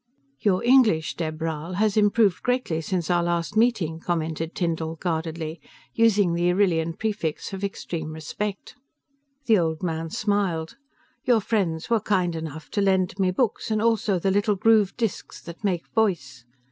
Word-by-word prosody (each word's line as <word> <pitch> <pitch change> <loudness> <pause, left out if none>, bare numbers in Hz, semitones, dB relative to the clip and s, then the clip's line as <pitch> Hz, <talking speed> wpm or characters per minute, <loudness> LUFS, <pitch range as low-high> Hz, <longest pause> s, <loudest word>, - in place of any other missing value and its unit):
"Your 185 +3 +1
English, 235 -10 +4
Dheb 155 -2 -3
Rhal, 160 +1 -3
has 210 +1 +1
improved 205 -2 +3
greatly 245 -10 0
since 175 0 -2
our 175 -1 +3
last 170 +3 -1
meeting," 205 -9 +2
commented 165 -1 -3
Tyndall 165 -2 -2
guardedly, 160 -1 -3 0.3
using 210 -6 +3
the 175 +1 +2
Arrillian 170 -4 +1
prefix 200 -6 -3
of 195 +1 -5
extreme 170 -5 -4
respect. 195 +6 -5 0.7
The 220 -5 +4
old 160 0 -1
man 165 -1 -2
smiled. 190 -5 -1 0.5
"Your 240 -3 +4
friends 195 -4 -1
were 230 - +4
kind 185 -5 0
enough 160 -2 -7
to 205 - 0
lend 190 -1 +1
me 190 -1 +3
books 220 +5 -1
and 215 -1 +1
also 220 -3 +2
the 190 +2 0
little 205 +1 +2
grooved 215 -1 +3
disks 225 -4 -3
that 170 +4 -10
make 180 -4 -1
voice." 145 - -1
180 Hz, 155 wpm, -25 LUFS, 160-210 Hz, 0.7 s, English